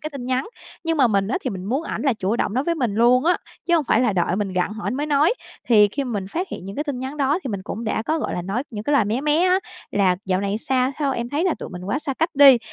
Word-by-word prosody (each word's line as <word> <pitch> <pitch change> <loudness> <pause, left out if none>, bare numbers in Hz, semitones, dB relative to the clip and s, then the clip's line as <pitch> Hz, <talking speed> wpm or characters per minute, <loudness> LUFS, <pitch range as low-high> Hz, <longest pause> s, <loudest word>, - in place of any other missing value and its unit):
cái 305 - -5
tin 275 -4 -7
nhắn. 255 +1 -1 0.4
Nhưng 330 0 0
mà 270 -4 +5
mình 200 -2 +1
á - - 0
thì - - -3
mình 185 -2 -6
muốn 260 +10 -1
ảnh - - -4
là 275 -4 +3
chủ 210 +1 -1
động 210 - -1
nói 260 +3 +1
với 340 - +1
mình 245 -10 -1
luôn 245 +4 +4
á, 355 +2 +4 0.3
chứ 345 - +3
hông 320 -4 +2
phải 230 - +3
là 240 -5 +2
đợi 175 0 0
mình 200 -2 -2
gặng 185 +2 0
hỏi 215 -1 -6
ảnh - - -1
mới 290 +3 -2
nói, 300 - +3 0.3
thì 210 -4 +6
khi 280 +7 -3
mình 210 -7 -3
phát 365 - -2
hiện - - -7
những 195 +1 -7
cái 295 - -1
tin 285 -4 -3
nhắn 265 +3 -5
đó 285 +2 +1
thì - - -3
mình 200 -2 -4
cũng 225 +3 -5
đã 220 - -1
có, 315 +7 0
gọi - - -3
là, 175 - -3
nói 200 +8 -2
những 215 -2 -6
cái 290 - 0
lời 275 -7 +4
mé 220 +5 -1
mé 300 +2 +2
á, 370 0 +4 0.3
là 190 -3 +2
"Dạo 185 0 0
này 200 +1 -1
sao 255 +2 +1
sao 280 -3 +1
em 240 -1 -3
thấy 295 +6 -1
là 370 - +2
tụi - - -6
mình 180 -1 -8
quá 210 +8 -1
xa 280 -2 -4
cách 325 +5 0
đi." 275 -3 +8
250 Hz, 320 wpm, -22 LUFS, 205-290 Hz, 0.4 s, đi